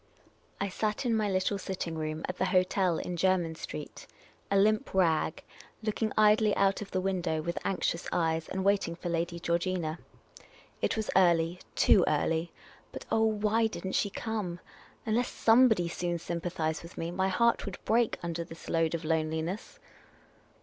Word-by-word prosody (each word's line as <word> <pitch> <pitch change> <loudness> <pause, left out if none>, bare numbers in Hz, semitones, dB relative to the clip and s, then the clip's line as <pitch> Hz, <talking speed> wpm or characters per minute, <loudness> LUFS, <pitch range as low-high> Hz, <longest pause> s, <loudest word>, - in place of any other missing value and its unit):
I 200 - 0
sat 210 +5 -2
in 235 -2 +2
my 215 -2 +1
little 190 +1 0
sitting 185 -3 -4
room 155 0 -3
at 180 - -5
the - - +2
hotel 185 -2 +2
in 180 - -4
Jermyn 175 -2 +2
Street, 75 - -8 0.4
a 200 - +2
limp 210 0 +2
rag, 165 -4 +2 0.4
looking 215 0 -1
idly 215 0 +5
out 195 0 +2
of 200 - -6
the 185 - -1
window 180 -4 -1
with 170 +1 -2
anxious 180 -3 -1
eyes, 160 -1 0
and 190 0 -2
waiting 200 -4 +1
for 175 +1 -5
Lady 170 +1 -2
Georgina. 170 -1 -1 0.8
It - - 0
was 220 - -2
early, 175 -1 +3 0.2
too 185 - +5
early, 160 +3 0 0.4
but - - -8
— - - -24
oh, 225 0 +3
why 220 +1 +2
did 215 - -7
n't 190 - -3
.she 205 - +1
come! 200 -4 -4 0.5
Unless 230 +3 +1
somebody 225 -6 +4
soon 175 0 -2
sym 170 0 -4
pathised 160 -3 -2
with 170 +1 -12
me, 165 +1 -3
my 190 +2 0
heart 235 +5 +2
would 195 - -5
break 230 0 +2
under 170 0 -3
this 165 0 -11
load 165 0 +1
of 160 - -5
loneliness 160 +4 -2
185 Hz, 170 wpm, -30 LUFS, 165-205 Hz, 0.8 s, idly